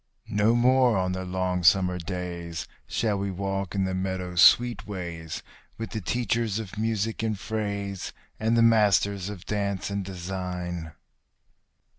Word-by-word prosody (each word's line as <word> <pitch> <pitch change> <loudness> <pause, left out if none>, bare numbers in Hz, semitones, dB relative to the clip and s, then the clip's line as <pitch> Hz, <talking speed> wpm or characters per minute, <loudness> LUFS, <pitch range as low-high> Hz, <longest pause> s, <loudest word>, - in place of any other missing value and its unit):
No 105 +3 +4
more 125 -1 +4
on 90 0 0
the 95 0 -3
long 90 0 -1
summer 90 +1 +4
days 85 -1 -5 0.2
shall 105 -3 0
we 100 0 -1
walk 95 0 -3
in 95 - +1
the 95 0 -1
meadow 95 -1 -2
sweet 120 +8 +5
ways 85 -5 -5 0.3
With 115 0 -5
the 110 - -3
teachers 115 0 0
of 110 -3 -6
music 110 0 -1
and 110 -2 -1
phrase, 100 -3 -3 0.3
and 115 +2 +2
the 115 - +5
masters 100 -3 +3
of 100 -4 -8
dance 100 -2 -2
and 100 0 -1
design. 90 -3 -5
100 Hz, 145 wpm, -27 LUFS, 90-110 Hz, 0.3 s, sweet